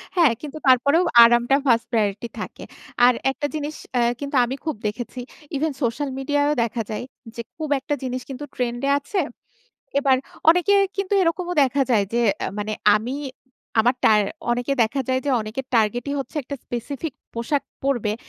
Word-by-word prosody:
হ্যাঁ, 330 -8 +5
কিন্তু 300 0 -7
তারপরেও 280 +7 +5 0.2
আরামটা 240 +3 +4
1st 230 -1 +3
প্রায়োরিটি 215 0 0
থাকে। - - -7 0.4
আর 250 - +6 0.2
একটা 290 +2 -4
জিনিস 300 0 -4 0.2
অ্যাঁ 240 0 +3
কিন্তু 280 0 -4
আমি 255 +3 -4
খুব 315 - -1
দেখেছি। 240 +3 -5 0.4
ইভেন 310 +2 0
সোশ্যাল 240 +5 -1
মিডিয়ায়ও 290 +2 +1
দেখা 230 0 -2
যায় 215 - -4 0.3
যে, 235 - -4 0.2
খুব 310 -2 -4
একটা 275 - -3
জিনিস 255 0 -3
কিন্তু 270 +2 -6
ট্রেন্ড 240 0 -2
এ - - +2
আছে। 375 +7 -3 0.8
এবার 270 -2 +3 0.3
অনেকের 395 +4 +4 0.2
কিন্তু 395 0 -1
এরকমও 355 +1 0
দেখা 275 +1 +1
যায়, 215 -4 +4
যে 240 - +2 0.2
অ্যাঁ - - -3
মানে, 215 +1 -2 0.2
আমি 245 +5 -4 0.6
আমার 245 +3 +3
টার 210 -1 +5 0.3
অনেকে 245 +3 0
দেখা 265 +5 -1
যায়, 260 0 +2
যে 285 - 0
অনেকের 220 +5 -5
টার্গেটই 240 +5 +1
হচ্ছে, 270 +3 -7
একটা 280 - -5
স্পেসিফিক 265 +5 -5 0.2
পোশাক 235 +5 -1 0.2
পড়বে। 240 -6 0
260 Hz, 165 wpm, -23 LUFS, 235-290 Hz, 0.8 s, আর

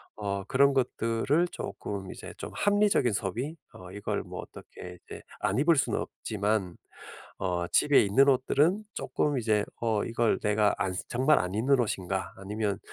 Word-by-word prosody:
어 100 -2 -3
그런 140 +1 +4
것들을 130 +5 +1
쪼끔 95 -2 -6
이제 - - -9
좀 - - -7
합리적인 205 - +2
소비 115 - -3 0.2
어 90 0 -11
이걸 100 +1 -3
뭐 - - -8
어떻게 90 0 -11
이제 - - -9 0.2
안 105 - 0
입을 165 +3 +4
수는 - - +1
없지만 105 -4 -2 0.6
어 90 -2 -1
집에 145 +10 +5
있는 130 +8 +4
옷들은 150 +9 +2
쪼끔 145 -2 -1
이제 110 -3 +1 0.2
어 110 -3 +1
'이걸 115 0 +1
내가 105 0 +2
안 95 -2 -1 0.2
정말 130 +5 +3
안 90 +1 -2
입는 130 +4 +3
옷인가?' 95 -4 -2
아니면 100 +1 -3
110 Hz, 290 characters per minute, -28 LUFS, 100-135 Hz, 0.6 s, 집에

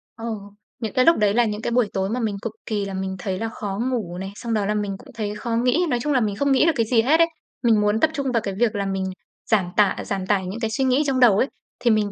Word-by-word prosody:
Ờ, 225 - -8 0.5
những 225 -2 -4
cái 255 -1 +3
lúc 330 - +6
đấy 205 -1 +3
là 240 +2 +4
những 210 -1 -3
cái 235 - -2
buổi 240 -2 +3
tối 190 0 -1
mà 240 +4 -1
mình 220 -4 -1
cực 230 - -4
kỳ 205 -2 -1
là 195 - -5
mình 190 0 -3
thấy 185 0 -3
là 225 - -2
khó 200 -3 -5
ngủ 190 -8 -3
này, 190 +1 -5
xong 235 +1 -4
đó 210 -2 +1
là 210 - 0
mình 205 -2 -2
cũng 275 +6 -15
thấy 210 -2 -3
khó 230 +2 -3
nghĩ, 250 +9 +2
nói 245 - +1
chung 295 +3 0
là 260 - +4
mình 210 -3 0
không 280 +6 +1
nghĩ 270 - +4
được 330 - +5
cái 230 - +1
gì 225 0 +3
hết 295 +8 +3
ấy. 335 - +6 0.4
Mình 225 -3 +4
muốn 210 +1 +2
tập 315 - +4
trung 275 -3 -2
vào 230 -2 +1
cái 195 - -3
việc 235 -3 +2
là 200 -1 -1
mình 195 -1 -2 0.5
giảm 210 -4 +4
tả 205 -3 +4
giảm 195 -2 -3
tải 190 -1 +1
những 195 +5 -5
cái 225 -2 -1
suy 245 +5 0
nghĩ 260 +3 +3
trong 265 -2 +1
đầu 235 -6 +6
ấy, 255 - +3 0.3
thì 240 - +3
mình 210 -2 +1
220 Hz, 305 wpm, -23 LUFS, 200-245 Hz, 0.5 s, lúc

